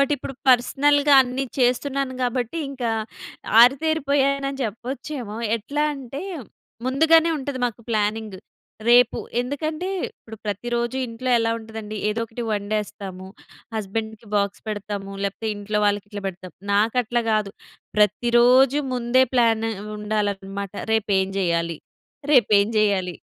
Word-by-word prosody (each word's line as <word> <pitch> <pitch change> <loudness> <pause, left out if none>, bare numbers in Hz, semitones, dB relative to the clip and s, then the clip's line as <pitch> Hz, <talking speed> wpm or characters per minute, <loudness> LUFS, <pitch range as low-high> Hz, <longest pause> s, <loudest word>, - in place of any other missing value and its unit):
But 275 +1 +2
ఇప్పుడు 270 - -7
పర్సనల్‌గా 285 +3 +4
అన్నీ 255 +2 -3
చేస్తున్నాను 260 +2 +1
గాబట్టి 250 +4 -1
ఇంకా 250 -4 -2 0.7
ఆరితేరిపోయానని 275 0 +2
చెప్పొచ్చేమో. 240 +1 -5 0.2
ఎట్లా 285 +7 -2
అంటే 275 +2 -7 0.6
ముందుగానే 320 +5 +4
ఉంటది 270 -1 -4
మాకు 235 -1 -7
ప్లానింగ్. 215 -1 -1 0.5
రేపు 245 +1 +5 0.2
ఎందుకంటే 310 +7 -3 0.2
ఇప్పుడు 220 -1 -13
ప్రతిరోజు 235 +4 -2
ఇంట్లో 235 +2 -4
ఎలా 230 0 +1
ఉంటదండి 220 -1 -8
ఏదో 215 +2 -1
ఒకటి 230 +2 -6
వండేస్తాము. 205 -2 -3 0.5
హస్బాండ్‌కి 220 +1 -4
బాక్స్ 200 -1 0
పెడతాము. 205 -1 -5
లేపోతే 200 +3 -3
ఇంట్లో 210 +1 -2
వాళ్ళకి 205 0 0
ఇట్లా 205 -2 -6
పెడతాము. 185 -1 -10 0.2
నాకట్లా 230 +3 +2
గాదు. 215 -2 0 0.4
ప్రతిరోజు 240 +6 +4
ముందే 250 +1 +3
ప్లాన్ 225 -2 +3 0.3
ఉండాలన్నమాట. 200 -2 -3 0.2
రేపు 220 -1 +1
ఏం 190 - -1
జేయ్యాలి? 170 -2 0 0.6
రేపు 255 -6 +5
ఏం 205 +3 0
జేయ్యాలి? 195 -4 +1
230 Hz, 115 wpm, -23 LUFS, 210-260 Hz, 0.7 s, రేపు